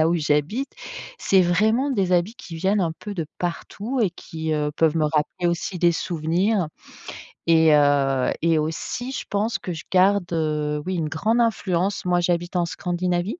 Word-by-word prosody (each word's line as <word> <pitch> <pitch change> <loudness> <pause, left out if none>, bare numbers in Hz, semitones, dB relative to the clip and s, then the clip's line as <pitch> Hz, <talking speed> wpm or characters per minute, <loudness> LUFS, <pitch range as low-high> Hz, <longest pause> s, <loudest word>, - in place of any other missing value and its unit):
là 155 - +5
où 170 - +2
j'habite, 155 - 0 0.5
c'est 195 - +4
vraiment 215 +10 +2
des 195 -8 0
habits 180 +5 +2
qui 235 -9 -10
viennent 195 +5 +1
un 165 -2 0
peu 210 -1 -6
de 165 - -2
partout 205 +8 -3
et 200 - +2
qui, 160 -2 -5
heu, 150 -1 0
peuvent 160 0 +2
me 155 - +2
rappeler 155 +4 -1
aussi 170 +2 -2
des 170 0 +4
souvenirs 175 +4 0 0.8
et 160 -1 +5
heu 140 -3 +3
et 165 -1 +3
aussi 165 +11 -3
je - - -4
pense 210 +3 0
que 180 - -6
je 160 -2 -7
garde, 190 +1 +4
heu, 150 -2 -1
oui 185 0 -2
une 165 -3 -1
grande 215 +10 0
influence. 195 -5 0
Moi 180 -1 +2
j'habite 175 +1 0
en 175 - +2
Scandinavie. 175 0 -1
175 Hz, 180 wpm, -23 LUFS, 160-195 Hz, 0.8 s, là